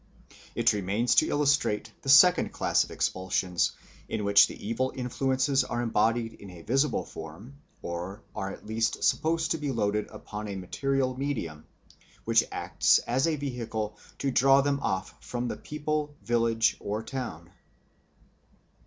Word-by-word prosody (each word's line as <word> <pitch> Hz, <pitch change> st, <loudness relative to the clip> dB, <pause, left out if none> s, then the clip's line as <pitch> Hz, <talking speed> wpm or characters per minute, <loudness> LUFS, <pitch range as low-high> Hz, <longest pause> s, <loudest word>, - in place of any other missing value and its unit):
It -, -, +3 dB
remains 105 Hz, +4 st, +1 dB
to -, -, +4 dB
illustrate 145 Hz, -7 st, +1 dB
the 135 Hz, -, -5 dB
second 180 Hz, +6 st, +7 dB
class -, -, +2 dB
of -, -, -10 dB
expulsions, 95 Hz, -1 st, 0 dB, 0.4 s
in 105 Hz, -, -2 dB
which 100 Hz, 0 st, +7 dB
the -, -, -9 dB
evil 130 Hz, +4 st, 0 dB
influences 130 Hz, +2 st, +1 dB
are 120 Hz, -, -3 dB
embodied 115 Hz, 0 st, +1 dB
in 100 Hz, -, -12 dB
a 90 Hz, -2 st, -12 dB
visible 135 Hz, -, +1 dB
form 95 Hz, -, -10 dB, 0.2 s
or 90 Hz, +5 st, -5 dB
are 95 Hz, -2 st, -3 dB
at -, -, -10 dB
least 110 Hz, +1 st, -1 dB
supposed 165 Hz, +1 st, +1 dB
to 165 Hz, -, 0 dB
be 145 Hz, -1 st, -2 dB
loaded 105 Hz, -3 st, 0 dB
upon 105 Hz, 0 st, -7 dB
a 100 Hz, -, -5 dB
material 130 Hz, +7 st, -1 dB
medium, 110 Hz, -, -4 dB, 0.6 s
which -, -, +4 dB
acts -, -, +3 dB
as 130 Hz, +6 st, +1 dB
a 160 Hz, -, +1 dB
vehicle 115 Hz, -6 st, -4 dB, 0.2 s
to 135 Hz, -, -1 dB
draw 135 Hz, +2 st, +5 dB
them 140 Hz, 0 st, 0 dB
off 95 Hz, -6 st, -2 dB
from 120 Hz, 0 st, -3 dB
the -, -, -3 dB
people, 150 Hz, 0 st, -3 dB
village, 115 Hz, -1 st, +2 dB
or 105 Hz, +2 st, -3 dB
town. 110 Hz, -11 st, -6 dB
120 Hz, 150 wpm, -28 LUFS, 105-135 Hz, 0.6 s, second